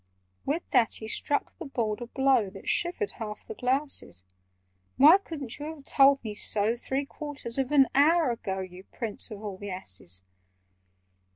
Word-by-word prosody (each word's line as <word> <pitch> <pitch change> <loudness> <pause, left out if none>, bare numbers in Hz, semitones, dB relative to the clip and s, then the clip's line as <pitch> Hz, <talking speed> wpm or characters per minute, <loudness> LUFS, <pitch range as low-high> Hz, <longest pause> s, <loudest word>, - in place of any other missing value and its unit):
With 310 +5 -2
that 240 -5 +3
he 220 - -3
struck 285 +5 -1
the 340 - -6
board 230 -5 -3
a 240 - -6
blow 265 -5 +2
That 195 0 -13
shivered 355 +4 -1
half 210 -2 -7
the - - -7
glasses. 260 - +2 0.7
"Why 310 +8 +8
couldn't 295 - -6
you 310 +2 -6
have 285 - -16
told 275 -1 +4
me 215 -2 -5
so 210 +2 +4
Three 265 +3 -3
quarters 280 -4 -5
of 265 +1 -1
an 280 -2 +6
hour 305 0 +4
ago, 190 -4 -4
You 185 0 -10
prince 225 -1 -3
of 215 -1 -9
all 200 -3 -6
the 205 - -7
asses? 95 - -4
250 Hz, 170 wpm, -27 LUFS, 210-285 Hz, 0.7 s, Why